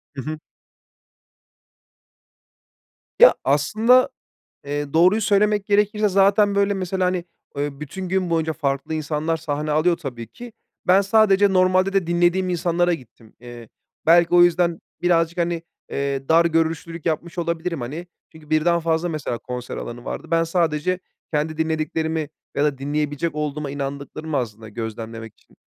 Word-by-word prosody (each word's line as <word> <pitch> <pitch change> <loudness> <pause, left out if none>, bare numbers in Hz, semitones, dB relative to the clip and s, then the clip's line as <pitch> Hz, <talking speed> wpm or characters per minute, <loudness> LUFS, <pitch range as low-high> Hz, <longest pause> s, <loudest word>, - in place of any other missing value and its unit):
Hı 135 - -4
hı. 155 +4 -5 2.8
Ya, - - +9
aslında, 220 - +3 0.6
eee, 145 0 -4
doğruyu 185 +6 +5
söylemek 205 -1 +2
gerekirse 210 +1 +2
zaten, 200 +1 +3
böyle, 200 0 +2
mesela, 185 0 -2
hani, 180 -1 -1 0.3
eee, 145 0 -3
bütün 185 +5 -6
gün 185 -1 0
boyunca 160 -1 0
farklı 150 0 -2
insanlar 155 +1 -1
sahne 150 -1 -3
alıyor 160 +3 +2
tabii 125 -8 -7
ki. 240 - -11 0.3
Ben 185 +2 +6
sadece 200 -1 +4
normalde 185 +1 +3
de 195 -3 +1
dinlediğim 175 +2 +2
insanlara 175 0 +1
gittim. 115 -5 -14
Eee, 120 -2 -11 0.4
belki 170 +1 +5
o 175 - +8
yüzden 175 -1 +2 0.2
birazcık, 170 -1 +2
hani, 170 -1 -1 0.3
eee, 140 -1 -3
dar 165 +1 +5
görüşlülük 165 0 -1
yapmış 170 +2 -2
olabilirim 170 -1 -2
hani. 150 +9 -6 0.3
Çünkü, 155 -1 -16
birden 170 +2 +2
fazla 165 +1 0
mesela 150 -7 -3
konser 125 0 -6
alanı 120 +1 -7
vardı. - - -5
Ben 165 0 +3
sadece, 165 +1 0 0.3
kendi 155 +1 -1
dinlediklerimi 160 0 -1 0.3
ya 145 - +2
da 145 -3 0
dinleyebilecek 145 +2 -2
olduğuma 150 -1 -3
inandıklarımı 140 +2 -5
aslında 110 -3 -4
gözlemlemek 110 0 -6
için, - - -27
165 Hz, 140 wpm, -22 LUFS, 145-180 Hz, 2.8 s, Ya